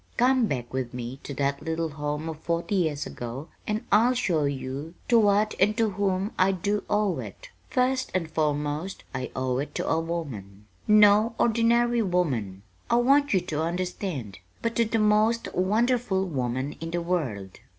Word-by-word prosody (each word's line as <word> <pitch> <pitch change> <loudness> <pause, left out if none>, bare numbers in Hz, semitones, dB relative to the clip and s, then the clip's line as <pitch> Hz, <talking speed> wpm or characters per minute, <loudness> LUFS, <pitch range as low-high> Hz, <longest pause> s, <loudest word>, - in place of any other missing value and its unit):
Come 250 -1 +4
back 125 - -4
with 130 -1 -3
me 125 +2 -6
to - - -8
that 140 +1 -1
little 160 0 -2
home 150 +1 -4
of 160 -1 -5
forty 170 +4 -2
years 160 -7 0
ago 125 +6 -7 0.2
and 215 +1 -2
I'll 245 +4 +5
show 170 -11 +1
you 140 +3 -4
to 235 -2 +6
what 210 0 +3
and 210 +3 +3
to 225 -3 +2
whom 195 +1 -1
I 190 +1 +4
do 205 +3 -1
owe 210 -3 +1
it. - - -9 0.2
First 260 0 +1
and 175 -3 0
foremost 150 +3 -1
I 130 0 -3
owe 130 -1 -1
it 145 - -5
to - - -2
a 160 - +2
woman 125 - -5 0.2
no 210 +2 +6
ordinary 235 +1 +3
woman, 130 - -1 0.3
I - - +3
want 275 +4 +4
you 190 - +3
to 160 -4 -3
understand 170 - -3 0.2
but 230 0 -1
to 235 - +4
the 225 +1 0
most 215 +2 +2
wonderful 215 +1 +1
woman 130 -3 -2
in 165 - -5
the 175 +1 -2
world." 125 - -3
180 Hz, 170 wpm, -26 LUFS, 145-215 Hz, 0.3 s, to